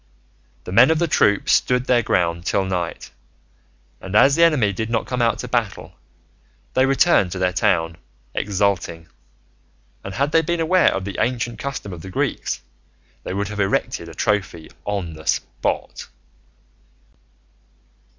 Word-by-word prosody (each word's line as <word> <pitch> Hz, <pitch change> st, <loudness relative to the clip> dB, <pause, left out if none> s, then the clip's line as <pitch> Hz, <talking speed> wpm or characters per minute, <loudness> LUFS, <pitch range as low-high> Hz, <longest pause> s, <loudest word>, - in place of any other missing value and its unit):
The -, -, -8 dB
men 120 Hz, +7 st, +6 dB
of 160 Hz, -, +3 dB
the 170 Hz, +1 st, +1 dB
troop 100 Hz, -9 st, +2 dB
stood 125 Hz, 0 st, +2 dB
their 125 Hz, -2 st, +3 dB
ground 85 Hz, -5 st, 0 dB
till 95 Hz, -, +1 dB
night, 90 Hz, -3 st, -4 dB, 0.9 s
and 95 Hz, +2 st, -6 dB
as 135 Hz, +6 st, +6 dB
the 170 Hz, -, +4 dB
enemy 130 Hz, -12 st, +3 dB
did 110 Hz, +4 st, -3 dB
not 115 Hz, -1 st, 0 dB
come 125 Hz, -1 st, -2 dB
out 115 Hz, -1 st, +2 dB
to -, -, -6 dB
battle, -, -, -2 dB, 0.8 s
they 130 Hz, +1 st, +3 dB
returned 135 Hz, -, +3 dB
to -, -, -5 dB
their 90 Hz, 0 st, 0 dB
town 80 Hz, -2 st, +1 dB, 0.4 s
exulting; 95 Hz, -5 st, -1 dB, 0.9 s
and 95 Hz, 0 st, -7 dB
had 140 Hz, +6 st, 0 dB
they 165 Hz, -, +4 dB
been 170 Hz, +1 st, -2 dB
aware 175 Hz, +2 st, +4 dB
of 95 Hz, -, -3 dB
the 100 Hz, -, -5 dB
ancient 120 Hz, -1 st, -1 dB
custom 135 Hz, -8 st, -5 dB
of 85 Hz, -, -9 dB
the 95 Hz, -, -9 dB
Greeks, 90 Hz, -, -2 dB, 0.6 s
they -, -, -5 dB
would 100 Hz, +1 st, -2 dB
have 105 Hz, 0 st, -6 dB
erected 95 Hz, -3 st, -1 dB
a 80 Hz, -, -12 dB
trophy 95 Hz, -6 st, -2 dB
on 100 Hz, -5 st, -3 dB
the 80 Hz, 0 st, -12 dB
spot. -, -, -2 dB
100 Hz, 155 wpm, -21 LUFS, 90-130 Hz, 0.9 s, men